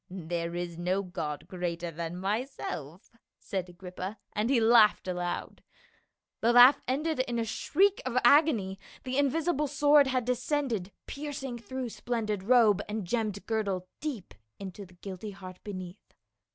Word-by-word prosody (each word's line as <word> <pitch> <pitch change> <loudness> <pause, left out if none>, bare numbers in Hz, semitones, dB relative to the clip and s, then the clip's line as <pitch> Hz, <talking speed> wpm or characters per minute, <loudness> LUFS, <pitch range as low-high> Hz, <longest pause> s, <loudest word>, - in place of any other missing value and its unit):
" - - -50 0.2
There 170 0 -2
is 175 -1 -4
no 185 +3 0
god 155 -5 -5
greater 175 -2 -3
than 165 +2 -5
myself," 190 - -4 0.3
said 190 -3 -4
Agrippa, 185 +3 -7 0.2
and 215 +3 0
he 265 -3 +4
laughed 225 -3 +5
aloud. 175 -1 -3 0.8
The 230 - +3
laugh 245 +3 +8
ended 300 +4 0
in 245 -2 0
a 230 - 0
shriek 390 - +2
of 255 -1 -2
agony; 240 -8 +4 0.2
the 260 +1 -1
invisible 300 +1 +1
sword 290 0 +5
had 255 -2 0
descended, 250 -5 -1
piercing 275 -4 -5
through 250 +2 -5
splendid 220 -4 -2
robe 215 -2 +5
and 210 -2 -3
gemmed 210 0 -2
girdle 200 -5 -1
deep 255 - -5 0.4
to 200 0 -10
the 180 - -19
guilty 190 +3 -7
heart 185 -2 -10
beneath. 185 -2 -8
215 Hz, 145 wpm, -29 LUFS, 185-255 Hz, 0.8 s, laugh